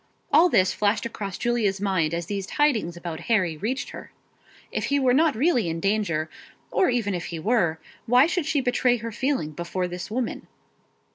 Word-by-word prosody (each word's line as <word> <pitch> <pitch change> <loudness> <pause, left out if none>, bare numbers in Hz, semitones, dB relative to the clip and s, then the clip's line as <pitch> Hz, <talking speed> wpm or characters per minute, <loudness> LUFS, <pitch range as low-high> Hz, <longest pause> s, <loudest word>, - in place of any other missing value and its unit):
All 330 +5 +7
this 185 - +3
flashed 210 +2 0
across 200 -4 -5
Julia's 225 -5 0
mind 185 -5 0
as 170 0 -3
these 195 +1 -4
tidings 230 - +1
about 170 -2 -6
Harry 185 -8 +2
reached 245 - -3
her. - - -10 0.6
If - - -2
he 285 0 +1
were 255 -2 +3
not 310 +1 +3
really 245 - +2
in 165 0 -3
danger, 195 -5 0 0.4
or 370 - +3
even 230 -5 0
if 175 -2 -3
he 170 - -5
were, 170 -3 +1 0.3
why 250 +4 +6
should 340 -2 -1
she 300 -3 +1
betray 245 0 +2
her 230 0 -6
feeling 260 - -1
before 175 +3 -3
this 180 +2 -6
woman? 235 +2 -3
210 Hz, 185 wpm, -25 LUFS, 175-250 Hz, 0.6 s, All